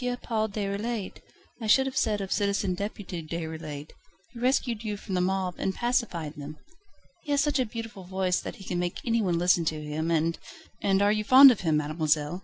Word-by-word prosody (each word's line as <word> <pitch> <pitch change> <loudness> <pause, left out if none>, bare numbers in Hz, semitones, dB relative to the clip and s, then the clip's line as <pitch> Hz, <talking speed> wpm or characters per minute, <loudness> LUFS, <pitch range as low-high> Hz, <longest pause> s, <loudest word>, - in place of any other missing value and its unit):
Paul 220 -2 -1
Déroulède 205 +1 -3 0.4
I 220 - -3
should 265 +5 +5
have 265 -1 -4
said 210 -4 +1
of 195 - -5
Citizen 200 -2 +1
Deputy 195 -2 -5
Déroulède. 160 -2 -6 0.4
He 235 - -9
rescued 245 -3 0
you 210 -2 -3
from 200 -1 -7
the 180 - +1
mob, 185 0 0
and 190 - -1
pacified 230 - -1
them. 150 +1 -8 0.6
He 310 - -14
has 285 - +3
such 290 -1 +1
a 255 - +1
beautiful 225 -4 -7
voice 185 0 0
that - - -7
he 195 - -12
can 180 -2 -3
make 175 0 -3
anyone 220 -7 +1
listen 175 0 +3
to 155 0 -1
him, 150 +2 -3
and 165 0 +1 0.2
..." - - -25
"And 195 0 +2
you - - +4
are 215 +1 +2
fond 265 +4 +9
of 230 - -1
him, 160 -4 +2
mademoiselle?" 155 +2 0
190 Hz, 205 wpm, -27 LUFS, 165-220 Hz, 0.6 s, fond